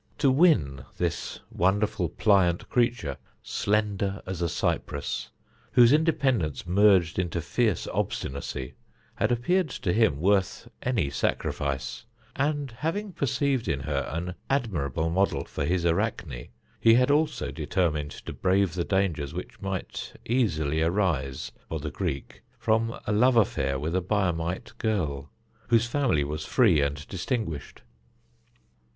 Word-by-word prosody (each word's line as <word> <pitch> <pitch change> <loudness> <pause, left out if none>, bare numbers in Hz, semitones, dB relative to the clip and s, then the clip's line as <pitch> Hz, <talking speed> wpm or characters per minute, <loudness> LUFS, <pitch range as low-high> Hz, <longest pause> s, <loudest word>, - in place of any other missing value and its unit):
To 140 -3 +4
win 80 - +3
this - - -2
wonderful, 95 -2 +1
pliant 95 -5 +2
creature, 120 - 0 0.3
slender 100 -1 -1
as 90 -2 -5
a 85 - +1
cypress, 85 -4 -2 0.4
whose 120 0 +7
independence 135 - +1
merged 95 -2 +4
into 90 -1 -1
fierce 105 +3 0
obstinacy, 65 -1 -3 0.4
had 105 +4 +1
appeared 155 +9 +1
to 90 - -2
him 110 -11 +3
worth 95 +2 +1
any 115 - 0
sacrifice; 65 -1 -2 0.3
and 145 -1 -1
having 165 - -3
perceived 140 -3 0
in 70 -3 0
her - - -2
an 85 +3 -3 0.2
admirable 80 - 0
model 90 -6 +1
for - - -3
his 85 +2 0
Arachne, 80 -7 -1 0.3
he 115 0 +6
had 125 +3 +4
also 150 +2 +1
determined 75 -5 -1
to - - -8
brave 95 -2 +2
the 90 -1 -1
dangers 85 -7 0
which - - -7
might 95 -2 -4
easily 80 - +1
arise 80 -7 0 0.2
for 80 - -3
the 75 0 -5
Greek 70 0 -4 0.2
from 115 +1 0
a - - -1
love 120 +5 +4
affair 70 -11 +2
with 80 +5 -2
a 95 - +2
Biamite 90 -3 -1
girl, 75 -11 -1 0.4
whose 115 -1 +4
family 120 - +1
was 75 +2 -4
free 100 - +4
and 70 +1 -2
distinguished. 95 - -4
95 Hz, 130 wpm, -27 LUFS, 75-115 Hz, 0.4 s, whose